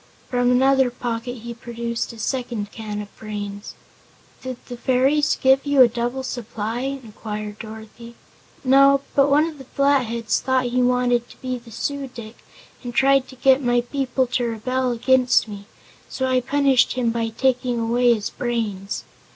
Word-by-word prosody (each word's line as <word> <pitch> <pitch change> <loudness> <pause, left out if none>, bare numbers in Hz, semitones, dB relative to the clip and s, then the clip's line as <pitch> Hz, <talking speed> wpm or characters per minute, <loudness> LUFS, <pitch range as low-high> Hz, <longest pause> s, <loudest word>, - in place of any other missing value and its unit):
From 245 -1 +2
another 265 +1 +4
pocket 240 0 -4
he 235 0 -6
produced 235 0 -4
a 230 - -12
second 235 -3 -3
can 210 -2 -5
of 205 - -16
brains. 205 -1 -6 0.7
"Did 255 -1 -5
the 245 - -7
fairies 265 +4 +2
give 265 +1 +4
you 285 -2 +6
a - - +6
double 240 +3 -3
supply?" 230 -2 -4
inquired 215 -5 -6
Dorothy. 220 +1 -10 0.5
"No, 275 +1 +5
but 275 0 +4
one 295 +3 +4
of 315 -3 -7
the - - -9
Flatheads 245 -5 +1
thought 260 -1 +1
he 245 +1 0
wanted 245 -1 +2
to - - -15
be 255 -1 -4
the 235 0 -16
Su 280 +5 -3
dic 235 -3 -10 0.5
and 240 -1 -6
tried 270 -1 +4
to 260 - -13
get 265 +1 +4
my 245 -1 +2
people 260 0 -1
to 245 0 -1
rebel 250 +3 -1
against 250 +1 +3
me, 205 -1 -9 0.4
so 260 - -2
I 255 -1 +2
punished 275 0 +3
him 245 -2 0
by 230 0 -1
taking 250 +1 0
away 240 +2 +3
his 215 -3 -1
brains. 215 -5 -3
245 Hz, 165 wpm, -22 LUFS, 230-260 Hz, 0.7 s, you